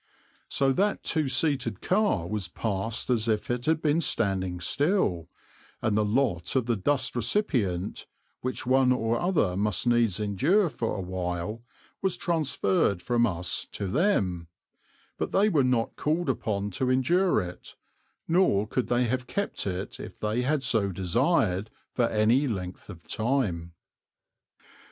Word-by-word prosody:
So 135 -1 +2
that 200 +9 0
two 155 -4 +1
seated 130 - +1
car 190 - +1
was 105 -2 -2
passed 110 +6 -2
as 115 -2 +2
if 110 +1 0
it 120 +2 -2
had 160 0 +1
been 155 +2 +2
standing 95 - 0
still, 95 - 0 0.5
and 110 -2 0
the 105 - +3
lot 105 - 0
of 130 -3 +2
the 120 -1 +1
dust 130 +7 0
recipient, 115 - -1 0.3
which 130 +1 -4
one 130 0 +4
or 115 -2 +1
other 170 - +1
must 105 +2 0
needs 120 -5 +2
endure 145 - +2
for 115 -5 -3
a 100 - -3
while, 90 +3 -4 0.4
was 190 -2 0
transferred 135 - +1
from 120 +4 +2
us 90 -3 -1
to 100 - -4
them; 95 - 0 0.7
but - - -2
they 205 +2 +4
were 150 -8 +3
not 125 -3 0
called 155 -1 0
upon 105 -4 -3
to 125 +7 -1
endure 170 - +3
it, 90 -2 -7 0.5
nor 165 - +3
could 125 +3 -2
they 120 +1 +2
have 125 +1 -1
kept 200 - -2
it 95 0 -4
if - - -9
they 105 +3 0
had 140 +2 0
so 110 -5 +1
desired, 90 +2 +1 0.2
for 120 -2 +2
any 115 +6 +2
length 95 -6 -5
of 90 -4 -11
time. 105 -9 -1
115 Hz, 150 wpm, -27 LUFS, 95-140 Hz, 0.7 s, one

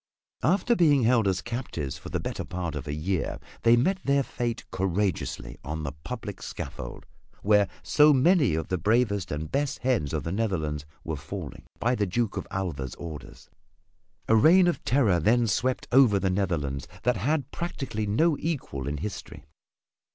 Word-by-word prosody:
After 195 +8 +3
being 150 - +4
held 115 -2 +3
as 95 -1 0
captives 115 - -4
for - - -9
the - - -2
better - - -4
part 90 -2 -4
of 75 -1 -5
a 70 - -2
year 90 +4 -2 0.2
they 115 +1 +5
met 185 +10 +2
their 140 0 +2
fate 120 -2 -3
courageously 95 +1 -2
on 80 +2 -4
the 70 - -3
public 105 - -7
scaffold - - -7 0.4
where 105 -1 +4 0.2
so 150 0 +5
many 140 - +4
of 80 -1 -3
the 90 - 0
bravest 105 0 +1
and 75 +2 -4
best 145 0 0
heads 120 - +1
of 80 -2 -2
the 80 - -3
Netherlands 80 -9 -2 0.2
were 80 - -3
falling 70 - -7
by 120 +2 +1
the 105 -5 0
Duke 110 +4 -1
of - - -4
Alva's 75 -10 -3
orders. 80 -4 -9 0.8
A 110 - +5
reign 170 - +6
of 175 - -1
terror 115 -10 +3
then 115 +8 +3
swept 125 +4 0
over 125 -5 +6
the 95 -1 0
Netherlands 80 -9 -1 0.2
that 125 -2 +2
has 95 - -4
had 145 -3 0
practically 135 -11 -3
no 150 +10 +3
equal 130 - -3
in 75 +1 -2
history. 100 +7 -7
105 Hz, 175 wpm, -27 LUFS, 80-130 Hz, 0.8 s, reign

